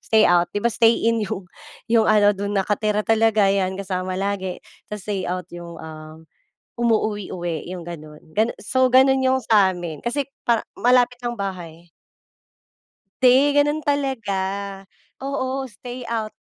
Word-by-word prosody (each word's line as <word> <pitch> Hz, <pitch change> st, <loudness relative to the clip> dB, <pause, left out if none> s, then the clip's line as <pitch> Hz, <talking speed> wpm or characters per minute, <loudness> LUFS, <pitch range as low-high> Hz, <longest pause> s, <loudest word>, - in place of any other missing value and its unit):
stay-out. 175 Hz, -6 st, +3 dB
Di 205 Hz, -, -2 dB
ba 235 Hz, -, +2 dB
stay-in 230 Hz, 0 st, +3 dB
yung 195 Hz, -2 st, -4 dB, 0.4 s
yung 225 Hz, 0 st, +3 dB
ano 210 Hz, -1 st, +5 dB
dun 200 Hz, +1 st, -3 dB
nakatira 210 Hz, +2 st, 0 dB
talaga 225 Hz, -2 st, +3 dB
'yan 195 Hz, -1 st, +1 dB
kasama 185 Hz, -1 st, -3 dB
lagi 190 Hz, -2 st, -2 dB, 0.3 s
tas 210 Hz, -3 st, -6 dB
stay-out 185 Hz, -3 st, -3 dB
yung, 175 Hz, -1 st, -9 dB
ah, 155 Hz, 0 st, -10 dB, 0.6 s
umuuwi-uwi 205 Hz, -8 st, -1 dB
'yong 180 Hz, -2 st, -6 dB
ganon 155 Hz, -3 st, -9 dB
gan 220 Hz, +2 st, +3 dB
so 260 Hz, +5 st, +2 dB
ganon 265 Hz, +1 st, +5 dB
'yong 260 Hz, 0 st, +2 dB
samin 180 Hz, -6 st, +2 dB
kasi 275 Hz, +4 st, -1 dB, 0.2 s
para 230 Hz, -2 st, +3 dB, 0.2 s
malapit 245 Hz, 0 st, +3 dB
lang 240 Hz, 0 st, -2 dB
bahay. 175 Hz, -4 st, -6 dB, 1.3 s
Hindi 265 Hz, +3 st, +5 dB
ganun 295 Hz, +1 st, -1 dB
talaga, 265 Hz, -9 st, -1 dB, 0.8 s
oo 270 Hz, -1 st, -2 dB
stay-out, 230 Hz, -1 st, -5 dB
210 Hz, 125 wpm, -22 LUFS, 185-240 Hz, 1.3 s, ano